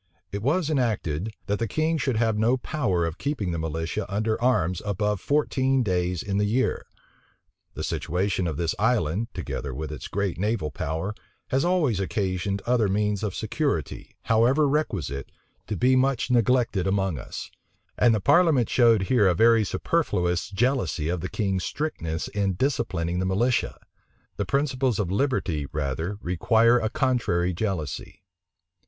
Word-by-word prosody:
It 100 - -4
was 155 - +1
enacted, 110 - 0 0.2
that 100 0 -1
the 115 - -1
king 155 +5 0
should 130 -4 0
have 110 -1 +2
no 115 +4 +2
power 95 - -1
of 85 +1 -4
keeping 140 -11 -2
the 85 - -2
militia 80 +6 -3
under 110 +3 -1
arms 90 -9 +1
above 105 0 -1
fourteen 135 -3 +1
days 90 -3 -1
in 100 0 -1
the 105 - +2
year. 120 +6 0 0.9
The - - -4
situation 90 +1 -1
of 80 - -3
this 85 -1 0
island, 110 -3 +1
together 70 -3 -4
with 75 +2 -5
its 75 - -6
great 100 -3 -2
naval 100 -7 -1
power, 80 +8 -3 0.4
has 135 +1 +1
always 165 - +2
occasioned 95 0 -2
other 120 -3 +2
means 105 0 0
of 105 -4 -3
security, 110 - -2
however 125 +7 +3
requisite, 95 - -2 0.4
to 105 - -3
be 130 +1 +4
much 130 -1 +1
neglected 120 -5 +2
among 95 -6 0
us: - - -7 0.4
and 120 -2 +4
the - - 0
parliament 145 - +4
showed 115 -5 +4
here 105 0 +3
a 90 - +3
very 115 +3 +5
superfluous 95 - 0
jealousy 100 - 0
of 90 -1 -1
the 90 - -4
king's 95 -4 -1
strictness 85 - -3
in 100 -2 0
disciplining 90 -8 -1
the 95 - 0
militia. 120 +7 +1 0.6
The 100 - -1
principles 130 0 0
of 95 -4 -1
liberty 95 - 0
rather 75 +6 -2
require 110 +7 +3
a 110 - -1
contrary 120 - +1
jealousy. 85 -7 -4
105 Hz, 155 wpm, -25 LUFS, 90-125 Hz, 0.9 s, very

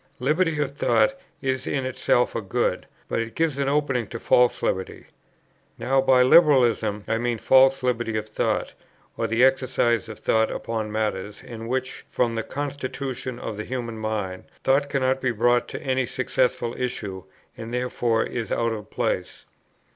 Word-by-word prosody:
Liberty 155 +4 +1
of 145 -2 0
thought 270 - +3 0.3
is 130 0 -1
in 135 -2 -1
itself 130 -1 +1
a 115 - -1
good; 95 -2 -1 0.2
but - - -1
it 115 0 -6
gives 160 -4 0
an 140 0 +1
opening 140 -6 0
to 115 - -6
false 125 +1 +3
liberty. 95 0 -2 0.7
Now 135 +1 +2
by 130 -1 +5
Liberalism 120 -8 +4
I 115 - 0
mean 120 -1 -1
false 130 +3 +4
liberty 120 -3 0
of 110 0 -4
thought, 110 - -1 0.4
or - - -1
the 115 +2 +2
exercise 125 -4 +2
of 110 - -8
thought 110 0 +2
upon 110 -2 -3
matters, 105 -2 -3
in 115 -1 -8
which, 130 +1 -3
from 120 -2 0
the 115 - -1
constitution 135 -2 -5
of 105 - -6
the 105 - -4
human 115 -2 -5
mind, 105 -4 -3 0.2
thought 140 +2 +2
cannot 130 -1 +1
be 130 - +1
brought 120 +2 +2
to - - -7
any 130 -2 0
successful 125 -2 0
issue, 100 -7 -4 0.3
and 115 -1 -8
therefore 120 -2 0
is 115 -2 -4
out 115 -1 +1
of 105 -2 -7
place. - - -3
125 Hz, 165 wpm, -24 LUFS, 115-130 Hz, 0.7 s, by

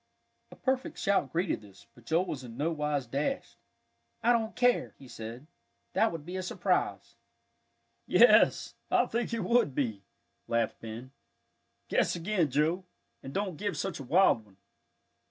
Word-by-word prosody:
A - - -13
perfect 260 0 -1
shout 195 -10 +1
greeted 170 - 0
this, 100 -1 -16
but 120 - -19
Joel 170 +6 +2
was 140 -7 -5
in 120 -1 -10
no 155 +4 0
wise 150 -3 -1
dashed. 140 - -2 0.7
"I 240 - +5
don't 225 -1 -1
care," 245 -1 +2
he 135 - -13
said, 115 +3 -8 0.5
"that 225 - +3
would 160 -3 -7
be 180 +2 -5
a - - -2
surprise." 180 - -1 0.9
"Yes, - - +5 0.2
I - - +4
think 235 +1 -2
it 230 -3 -1
would 235 - +2
be," 110 -8 -1 0.5
laughed 115 -1 0
Ben. 115 +3 -8 0.8
"Guess - - +1
again, 175 -2 0
Joe, 155 +7 +1 0.4
and 135 - -8
don't 190 0 -2
give 205 +3 -2
such 190 -6 -3
a - - -6
wild 145 - +4
one." 100 -2 -23
155 Hz, 155 wpm, -30 LUFS, 125-195 Hz, 0.9 s, I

